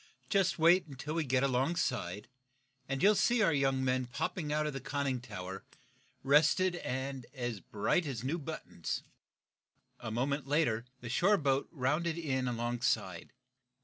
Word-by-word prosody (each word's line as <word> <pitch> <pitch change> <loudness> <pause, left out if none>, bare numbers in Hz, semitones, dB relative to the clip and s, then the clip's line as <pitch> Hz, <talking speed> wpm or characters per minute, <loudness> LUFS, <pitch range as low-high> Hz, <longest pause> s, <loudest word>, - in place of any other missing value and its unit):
"Just 195 -2 +3
wait 170 +2 +5
until 140 +2 -6
we 165 0 0
get 130 -1 +1
alongside, 125 - 0 0.6
and 135 +2 -1
you'll 205 +2 +7
see 235 +4 +3
your 215 -7 +4
young 135 -2 +1
men 130 -1 +1
popping 160 +4 -3
out 150 0 +1
of 150 - -2
the 135 - -4
conning 135 -3 -2
tower, 95 -5 -7 0.6
rested 155 +6 +4
and 130 -3 -4
as 120 -4 -3
bright 110 - 0
as 125 -5 -4
new 155 +7 -1
buttons." 150 - -5 1.0
A 120 - -5
moment 135 +5 -1
later 135 -6 +1 0.2
the 120 - -6
shore 195 - +4
boat 140 -3 +1
rounded 155 +4 0
in 130 -6 -1
alongside. 120 -6 -1
135 Hz, 150 wpm, -32 LUFS, 125-160 Hz, 1.0 s, you'll